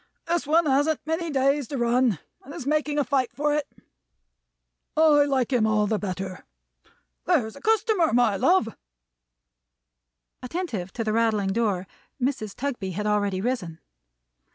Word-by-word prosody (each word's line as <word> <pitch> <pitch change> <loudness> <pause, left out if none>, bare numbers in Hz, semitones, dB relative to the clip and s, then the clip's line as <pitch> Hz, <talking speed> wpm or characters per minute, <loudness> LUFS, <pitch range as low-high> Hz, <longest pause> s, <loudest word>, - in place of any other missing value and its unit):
This 335 -3 -1
one 325 +2 +4
hasn't 290 +2 +1
many 325 +2 -2
days 275 -1 +1
to 280 - -4
run, 240 -3 +2 0.3
and 280 - -10
is 255 - -7
making 300 0 0
a 290 - +3
fight 260 -1 0
for 295 +1 0
it. 295 -1 -1 1.3
I 300 -2 +5
like 270 -2 0
him 225 -3 +3
all 215 -1 +2
the 210 0 0
better. 185 -1 -5 0.8
There's 250 -12 +1
a 280 - -12
customer, 435 -5 +2
my 235 -3 +3
love!" 225 - +2 1.7
Attentive 250 - -4
to 230 - -3
the 215 -1 -1
rattling 220 -3 +1
door, 205 -5 0 0.3
Mrs. 245 -6 -2
Tugby 240 -9 -3
had 210 +4 -3
already 205 -2 0
risen. 195 -9 -3
255 Hz, 145 wpm, -25 LUFS, 215-295 Hz, 1.7 s, I